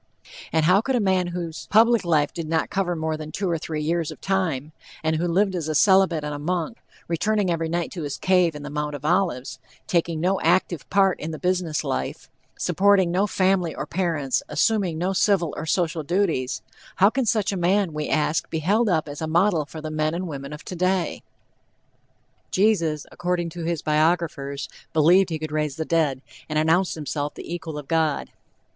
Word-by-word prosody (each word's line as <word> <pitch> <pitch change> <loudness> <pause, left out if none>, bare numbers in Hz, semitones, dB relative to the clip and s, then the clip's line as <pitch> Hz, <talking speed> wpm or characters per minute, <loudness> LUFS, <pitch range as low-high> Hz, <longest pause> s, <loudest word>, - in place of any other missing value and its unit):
And 160 0 +2
how 185 +4 +5
could 265 +3 -1
a - - +2
man 190 -3 +2
whose 170 -2 -5
public 230 +1 +4
life 155 -4 +1
did 165 -2 -5
not 160 0 0
cover 185 -3 0
more 160 -1 -2
than 155 0 -7
two 195 +3 -2
or 170 -2 0
three 155 -1 -4
years 165 0 0
of - - -9
time, 160 -7 -1 0.3
and 160 0 +1
who 175 +2 0
lived 190 +3 +2
as 170 -4 -3
a 155 - -1
celibate 190 -3 +4
and 150 0 -3
a 145 - -5
monk, 175 +7 -2 0.3
returning 195 +3 +1
every 165 -1 -1
night 170 0 -2
to 175 - -6
his 145 -2 -4
cave 180 -4 +2
in 150 - -7
the 145 - -6
Mount 150 0 -2
of 145 0 -8
Olives, 170 -7 0 0.3
taking 170 -2 0
no 185 +4 +1
active 170 -2 +1
part 195 -2 +3
in 155 - -4
the 160 - -5
business 180 -3 -1
life - - -4 0.3
supporting 190 0 +3
no 190 +4 +2
family 185 -4 +1
or - - -4
parents, 165 -7 -1
assuming 180 +2 +1
no 180 +4 0
civil 190 -4 +2
or - - -5
social 165 -1 0
duties 160 -6 -1 0.3
how 200 +3 +5
can 255 -1 -1
such 215 -2 +1
a - - -2
man, 185 0 +1
we 150 -1 -3
ask, 155 +1 0
be 160 - -2
held 205 +8 +2
up 160 -4 +1
as 145 +1 -7
a 160 - -2
model 170 -2 +2
for 155 +1 -8
the 155 0 -5
men 155 +1 0
and 180 +1 -3
women 140 -2 -6
of 150 +1 -9
today? 185 0 -1 1.3
Jesus, 170 -7 +1
according 175 -1 -1
to 165 0 -6
his 170 -2 -2
biographers, 155 -3 0 0.3
believed 175 +5 +5
he 160 - -2
could 155 -1 -6
raise 150 -2 -1
the 160 - -3
dead, 150 -6 +1 0.3
and 155 - -1
announced 165 +4 +2
himself 145 -1 -3
the - - -7
equal 160 -3 -5
of 145 -2 -7
God. 160 -3 0
170 Hz, 200 wpm, -24 LUFS, 155-185 Hz, 1.3 s, how